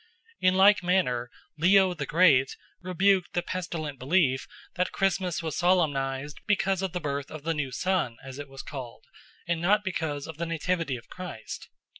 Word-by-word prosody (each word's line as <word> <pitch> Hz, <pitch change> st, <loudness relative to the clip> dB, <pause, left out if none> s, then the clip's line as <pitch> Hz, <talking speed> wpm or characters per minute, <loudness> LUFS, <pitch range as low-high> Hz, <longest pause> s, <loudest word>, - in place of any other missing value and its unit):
In 185 Hz, 0 st, +3 dB
like 200 Hz, +2 st, +6 dB
manner 175 Hz, -10 st, +1 dB, 0.3 s
Leo 190 Hz, +2 st, +5 dB
the 145 Hz, -5 st, -5 dB
Great 150 Hz, -6 st, +4 dB, 0.2 s
rebuked 185 Hz, +1 st, +2 dB
the 175 Hz, -, 0 dB
pestilent 165 Hz, -6 st, -4 dB
belief 135 Hz, -2 st, +2 dB, 0.3 s
that 180 Hz, +1 st, -1 dB
Christmas 185 Hz, -3 st, 0 dB
was 160 Hz, -2 st, -3 dB
solemnised 145 Hz, -6 st, +1 dB
because 195 Hz, -2 st, +1 dB
of 190 Hz, -3 st, -2 dB
the 180 Hz, -, -1 dB
birth 140 Hz, -3 st, -3 dB
of 155 Hz, -2 st, -8 dB
the 165 Hz, +1 st, 0 dB
new 145 Hz, -4 st, -3 dB
sun, 175 Hz, -6 st, 0 dB
as 135 Hz, +1 st, -8 dB
it 145 Hz, -1 st, -7 dB
was 135 Hz, 0 st, -9 dB
called, 125 Hz, -5 st, -8 dB, 0.4 s
and 170 Hz, -1 st, 0 dB
not 205 Hz, +4 st, +3 dB
because 160 Hz, -7 st, -3 dB
of 160 Hz, -2 st, -8 dB
the 170 Hz, +1 st, -3 dB
nativity 165 Hz, -3 st, -1 dB
of 120 Hz, -1 st, -10 dB
Christ. 180 Hz, -12 st, -8 dB
165 Hz, 170 wpm, -27 LUFS, 140-185 Hz, 0.4 s, like